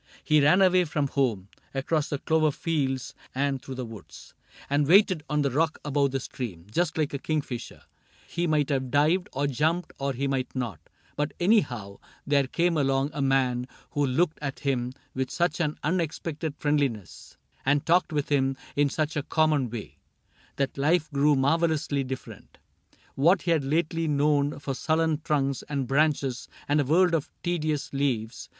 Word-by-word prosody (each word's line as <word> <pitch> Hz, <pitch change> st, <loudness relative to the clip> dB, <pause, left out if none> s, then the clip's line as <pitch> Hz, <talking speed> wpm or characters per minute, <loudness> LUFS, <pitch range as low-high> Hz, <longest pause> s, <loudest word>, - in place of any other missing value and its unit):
He 150 Hz, -1 st, +4 dB
ran 180 Hz, +7 st, +5 dB
away 185 Hz, -1 st, +4 dB
from 150 Hz, -3 st, -1 dB
home. 115 Hz, -10 st, 0 dB, 0.3 s
Across 145 Hz, +3 st, 0 dB
the 145 Hz, -, -1 dB
clover 155 Hz, +2 st, +2 dB
fields 135 Hz, -5 st, -2 dB, 0.2 s
and 135 Hz, -1 st, 0 dB
through 135 Hz, -, -7 dB
the 125 Hz, -1 st, -4 dB
woods, 110 Hz, -4 st, -12 dB
CAPTAIN -, -, -34 dB
CRAIG -, -, -20 dB
7 -, -, -3 dB
And 145 Hz, -, +1 dB
waited 185 Hz, -2 st, +5 dB
on 150 Hz, 0 st, +1 dB
the 140 Hz, -, 0 dB
rock 155 Hz, +4 st, +1 dB
above 145 Hz, -1 st, +2 dB
the 135 Hz, 0 st, -2 dB
stream, 110 Hz, -10 st, -6 dB
Just 170 Hz, +6 st, 0 dB
like 150 Hz, -2 st, 0 dB
a 140 Hz, -, -2 dB
kingfisher. 145 Hz, -6 st, -4 dB, 0.4 s
He 175 Hz, 0 st, -2 dB
might 150 Hz, -2 st, +1 dB
have 130 Hz, -3 st, -1 dB
dived, 155 Hz, +7 st, +2 dB
Or 140 Hz, +2 st, -1 dB
jumped, 160 Hz, +6 st, 0 dB
or 140 Hz, 0 st, -1 dB
he 135 Hz, +3 st, -2 dB
might 135 Hz, -1 st, -2 dB
not; 120 Hz, -, -3 dB, 0.4 s
but 150 Hz, 0 st, -2 dB
anyhow, 125 Hz, -, +1 dB, 0.3 s
There 140 Hz, -2 st, +2 dB
came 170 Hz, +3 st, +1 dB
along 135 Hz, 0 st, +1 dB
a 145 Hz, -, -3 dB
man 130 Hz, -2 st, +1 dB, 0.2 s
who 145 Hz, -, 0 dB
looked 150 Hz, +5 st, +1 dB
at 140 Hz, -2 st, -4 dB
him 125 Hz, -3 st, -1 dB, 0.2 s
With 130 Hz, -1 st, -2 dB
such 170 Hz, +2 st, 0 dB
an 155 Hz, -3 st, -1 dB
unexpected 160 Hz, -2 st, -2 dB
friendliness, 140 Hz, -, -2 dB, 0.3 s
And 145 Hz, +1 st, +2 dB
talked 175 Hz, +1 st, +3 dB
with 145 Hz, -2 st, -1 dB
him 135 Hz, -2 st, +1 dB, 0.2 s
in 145 Hz, 0 st, +3 dB
such 155 Hz, +2 st, -2 dB
a 145 Hz, -, 0 dB
common 150 Hz, -3 st, +1 dB
way, 110 Hz, -2 st, -8 dB, 0.6 s
That 140 Hz, 0 st, -2 dB
life 160 Hz, +3 st, +2 dB
grew 145 Hz, +1 st, +3 dB
marvelously 145 Hz, 0 st, +1 dB
different: 130 Hz, 0 st, -8 dB, 0.6 s
What 170 Hz, +7 st, +3 dB
he 170 Hz, -, +1 dB
had 160 Hz, -4 st, +2 dB
lately 165 Hz, +3 st, 0 dB
known 145 Hz, 0 st, +2 dB
for 140 Hz, -1 st, -4 dB
sullen 160 Hz, +2 st, 0 dB
trunks 140 Hz, -4 st, 0 dB
And 140 Hz, -3 st, -1 dB
branches, 135 Hz, -2 st, +1 dB, 0.2 s
and 145 Hz, +1 st, +3 dB
a -, -, -1 dB
world 175 Hz, +5 st, +4 dB
of 160 Hz, -4 st, 0 dB
tedious 155 Hz, -5 st, -1 dB
leaves. 125 Hz, -5 st, -2 dB
145 Hz, 175 wpm, -27 LUFS, 135-160 Hz, 0.6 s, ran